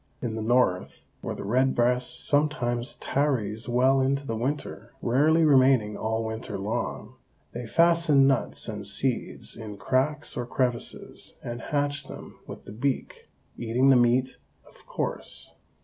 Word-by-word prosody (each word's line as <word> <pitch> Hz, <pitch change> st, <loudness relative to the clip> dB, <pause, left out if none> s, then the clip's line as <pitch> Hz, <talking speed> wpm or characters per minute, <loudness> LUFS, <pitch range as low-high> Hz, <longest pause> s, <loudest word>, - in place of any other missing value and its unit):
In 120 Hz, -3 st, -3 dB
the 110 Hz, -, -4 dB
North, 110 Hz, -5 st, +1 dB, 0.2 s
where -, -, -4 dB
the -, -, -7 dB
red 130 Hz, +6 st, +1 dB
breast 125 Hz, +1 st, +1 dB
sometimes 140 Hz, -4 st, 0 dB
tarries 120 Hz, -6 st, -1 dB
well 130 Hz, +3 st, +3 dB
into 140 Hz, +1 st, 0 dB
the 115 Hz, -, -3 dB
winter, 135 Hz, +6 st, -4 dB
rarely 155 Hz, +7 st, +3 dB
remaining 130 Hz, -7 st, +4 dB
all 110 Hz, +2 st, -2 dB
winter 110 Hz, -1 st, -5 dB
long, 100 Hz, +3 st, -4 dB, 0.3 s
they 120 Hz, 0 st, -6 dB
fasten 165 Hz, -2 st, +4 dB
nuts 75 Hz, -, 0 dB
and -, -, -5 dB
seeds -, -, -2 dB
in 110 Hz, -3 st, -8 dB
cracks 140 Hz, +6 st, 0 dB
or 120 Hz, -1 st, -3 dB
crevices 125 Hz, -2 st, -3 dB
and 120 Hz, +1 st, -5 dB
hatch 145 Hz, -1 st, -2 dB
them -, -, -11 dB
with -, -, -10 dB
the 100 Hz, -, -9 dB
beak, 130 Hz, +4 st, -3 dB, 0.3 s
eating 120 Hz, +4 st, +3 dB
the -, -, +6 dB
meat, 125 Hz, +1 st, +2 dB, 0.3 s
of -, -, -21 dB
course. -, -, -5 dB
125 Hz, 145 wpm, -26 LUFS, 115-140 Hz, 0.3 s, the